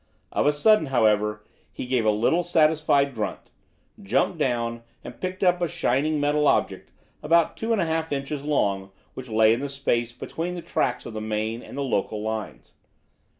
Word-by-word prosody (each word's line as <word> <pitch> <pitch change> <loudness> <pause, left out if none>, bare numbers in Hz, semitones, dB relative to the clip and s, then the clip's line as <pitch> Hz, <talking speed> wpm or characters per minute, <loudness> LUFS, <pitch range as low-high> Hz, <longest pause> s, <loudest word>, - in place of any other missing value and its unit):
Of - - +1
a - - +6
sudden, 160 +3 +3
however, 105 -4 +1 0.3
he - - -6
gave 125 -3 0
a - - +4
little 115 +11 +2
satisfied 155 -4 +2
grunt, 110 -3 -5 0.5
jumped 130 - 0
down, 115 -4 -1 0.2
and - - -10
picked 185 +1 -3
up 180 -1 +3
a 175 - +2
shining 155 -2 0
metal 145 +1 +2
object, - - 0 0.3
about 165 +2 +3
two 225 +1 -3
and 225 - +2
a 170 - +2
half 160 0 -2
inches 140 0 -3
long, 100 -10 0 0.2
which 130 -1 -9
lay 110 0 +4
in 115 - -1
the 140 +1 -4
space 120 -4 -1
between 170 +8 -5
the 175 - -7
tracks - - -1
of 120 - -7
the 110 - -4
main 110 +2 -2
and - - -10
the 140 - -1
local 110 -4 -1
lines. 110 -1 -5
140 Hz, 185 wpm, -25 LUFS, 110-160 Hz, 0.5 s, a